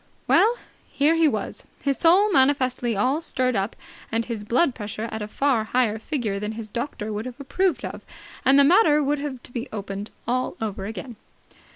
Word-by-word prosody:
Well, 465 Hz, +3 st, +5 dB, 0.4 s
here 290 Hz, +3 st, +3 dB
he 330 Hz, -1 st, +4 dB
was, -, -, -3 dB
his 275 Hz, -2 st, -1 dB
soul 375 Hz, +5 st, +5 dB
manifestly 260 Hz, -, +2 dB
all 260 Hz, +9 st, +1 dB
stirred 255 Hz, -6 st, 0 dB
up 195 Hz, +2 st, -1 dB, 0.4 s
and 225 Hz, 0 st, 0 dB
his 230 Hz, -3 st, -5 dB
blood 255 Hz, +7 st, +2 dB
pressure 215 Hz, -1 st, -5 dB
at 220 Hz, -, -4 dB
a 210 Hz, -, -3 dB
far 255 Hz, 0 st, +1 dB
higher 220 Hz, -2 st, +1 dB
figure 220 Hz, -6 st, -2 dB
than 210 Hz, +2 st, -3 dB
his 220 Hz, -1 st, -7 dB
doctor 220 Hz, -2 st, -4 dB
would 215 Hz, +4 st, -4 dB
have 255 Hz, +2 st, -9 dB
approved 280 Hz, 0 st, 0 dB
of, -, -, -6 dB, 0.4 s
and 270 Hz, +1 st, +5 dB
the 280 Hz, -, +7 dB
matter 300 Hz, -1 st, +5 dB
would 290 Hz, +1 st, 0 dB
have 275 Hz, -4 st, -5 dB
to -, -, -12 dB
be 245 Hz, +2 st, -5 dB
opened 200 Hz, 0 st, -5 dB, 0.2 s
all 255 Hz, +1 st, -1 dB
over 200 Hz, -3 st, -4 dB
again. 225 Hz, +2 st, -7 dB
255 Hz, 190 wpm, -24 LUFS, 220-285 Hz, 0.4 s, the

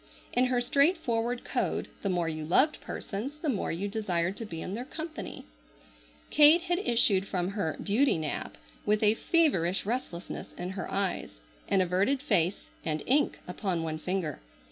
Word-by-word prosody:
In 250 Hz, +1 st, +4 dB
her 250 Hz, -1 st, +1 dB
straightforward 245 Hz, -4 st, +1 dB
code -, -, -1 dB
the 200 Hz, -, -1 dB
more 175 Hz, -2 st, 0 dB
you 155 Hz, -1 st, -3 dB
loved 260 Hz, -, +3 dB
persons 240 Hz, +9 st, -5 dB
the 305 Hz, 0 st, -2 dB
more 220 Hz, -8 st, -1 dB
you 185 Hz, +5 st, -2 dB
desired 190 Hz, -4 st, -1 dB
to 225 Hz, -, -4 dB
be 165 Hz, -4 st, -6 dB
in 185 Hz, -, -5 dB
their 235 Hz, +4 st, -3 dB
company. 315 Hz, +3 st, -6 dB, 0.9 s
Kate 305 Hz, +3 st, +8 dB
had 350 Hz, 0 st, 0 dB
issued 230 Hz, -, +3 dB
from 180 Hz, -2 st, -1 dB
her 195 Hz, -6 st, -2 dB
"beauty 225 Hz, +3 st, +3 dB
nap" 155 Hz, -2 st, -4 dB, 0.3 s
with 210 Hz, +1 st, +1 dB
a 210 Hz, 0 st, +6 dB
feverish 225 Hz, -, +2 dB
restlessness 210 Hz, -6 st, -4 dB
in 180 Hz, +1 st, -4 dB
her 190 Hz, -1 st, -5 dB
eyes, 195 Hz, -, -2 dB, 0.3 s
an 195 Hz, -, +3 dB
averted 190 Hz, +9 st, +2 dB
face, 200 Hz, -, 0 dB
and 155 Hz, -1 st, -2 dB
ink 285 Hz, +3 st, +2 dB
upon 180 Hz, -2 st, -2 dB
one 155 Hz, -1 st, -3 dB
finger. 180 Hz, -3 st, -2 dB
205 Hz, 165 wpm, -29 LUFS, 180-260 Hz, 0.9 s, Kate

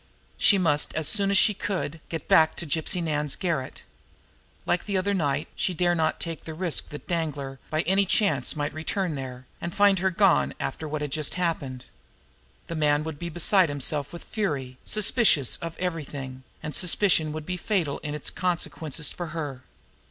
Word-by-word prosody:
She 200 Hz, -, +6 dB
must, 155 Hz, -5 st, +1 dB
as 160 Hz, -2 st, 0 dB
soon 200 Hz, -2 st, +2 dB
as 200 Hz, -, +3 dB
she 210 Hz, -, +5 dB
could, 180 Hz, -6 st, -3 dB
get 165 Hz, -, -5 dB
back 160 Hz, 0 st, +5 dB
to 170 Hz, -, -4 dB
Gypsy 160 Hz, +3 st, 0 dB
Nan's 150 Hz, -3 st, -1 dB
garret. 160 Hz, -9 st, -3 dB, 0.8 s
Like 175 Hz, -, 0 dB
that 200 Hz, -, -1 dB
other 200 Hz, +2 st, +1 dB
night, 145 Hz, -5 st, 0 dB
she 180 Hz, -, 0 dB
dared 175 Hz, +1 st, +2 dB
not 160 Hz, -1 st, +1 dB
take 165 Hz, -2 st, -4 dB
the 160 Hz, -, -6 dB
risk 175 Hz, -1 st, 0 dB
that 150 Hz, -, -9 dB
Danglar, 145 Hz, -6 st, -2 dB
by 155 Hz, +1 st, 0 dB
any 195 Hz, +2 st, +3 dB
chance, 170 Hz, -, +2 dB
might 145 Hz, -1 st, -2 dB
return 165 Hz, +2 st, -2 dB
there 130 Hz, -2 st, -6 dB, 0.2 s
and 170 Hz, -, -4 dB
find 200 Hz, -2 st, +5 dB
her 190 Hz, +1 st, +2 dB
gone 185 Hz, -2 st, +3 dB
after 155 Hz, -, -3 dB
what 150 Hz, 0 st, -3 dB
had 145 Hz, -, -4 dB
just 155 Hz, 0 st, -1 dB
happened. 155 Hz, -8 st, -2 dB, 0.8 s
The 165 Hz, -, -5 dB
man 150 Hz, -1 st, +2 dB
would 155 Hz, -2 st, -6 dB
be 170 Hz, -, -4 dB
beside 175 Hz, +1 st, +3 dB
himself 145 Hz, 0 st, 0 dB
with 170 Hz, -, -8 dB
fury, 140 Hz, -, -3 dB
suspicious 215 Hz, -, +3 dB
of 165 Hz, -1 st, -6 dB
everything 145 Hz, -7 st, -4 dB, 0.2 s
and 150 Hz, -, -4 dB
suspicion 180 Hz, -3 st, +3 dB
would 155 Hz, 0 st, -5 dB
be 180 Hz, -, -2 dB
fatal 180 Hz, -6 st, -1 dB
in 150 Hz, 0 st, -4 dB
its 150 Hz, -, -3 dB
consequences 165 Hz, -4 st, -1 dB
for 175 Hz, -, -5 dB
her. 150 Hz, -5 st, -5 dB
160 Hz, 180 wpm, -26 LUFS, 145-180 Hz, 0.8 s, She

